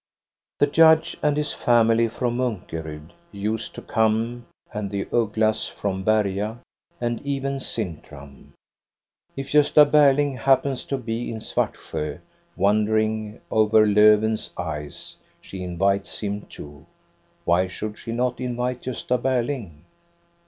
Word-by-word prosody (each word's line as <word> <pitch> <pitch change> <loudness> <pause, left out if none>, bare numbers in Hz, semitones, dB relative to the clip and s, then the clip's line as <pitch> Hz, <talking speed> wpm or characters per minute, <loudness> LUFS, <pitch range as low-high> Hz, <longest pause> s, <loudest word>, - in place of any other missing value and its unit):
The - - +4
judge 160 +2 +4
and 150 -1 +1
his 150 0 -1
family 115 -1 +3
from 120 +2 -2
M;:nkorud 80 -9 -5 0.2
used 105 +2 -3
to - - -8
come, 115 +2 0 0.3
and 105 -1 -3
the 100 0 -3
Ugglas 110 -1 +1
from 95 -2 -3
l^crcA. 105 0 +1 0.4
And 120 -1 -2
oven 140 -1 -3
Sintram. 75 - -6 0.8
If 135 0 -6
Gosta 150 0 +6
Berling 145 -2 +3
hap 135 +2 +4
peiis 135 -2 -3
to 135 - -1
bo 120 -3 -6
in 115 0 -3
Svartsjo, 75 -8 -3 0.4
wandering 110 +2 +1
over 110 0 +4
Lofven's 105 +1 +4
ice, 75 -4 -6 0.3
jihc 90 -2 -7
inviics 100 +2 0
him 100 -1 -4
too. 75 +2 -11 0.6
Why 90 +2 +3
should 105 +3 -6
she 115 - -6
not 125 +1 -1
invite 125 0 -3
i;<.v:a 125 0 -1
Borling.? 120 - -2
110 Hz, 125 wpm, -23 LUFS, 100-125 Hz, 0.8 s, Gosta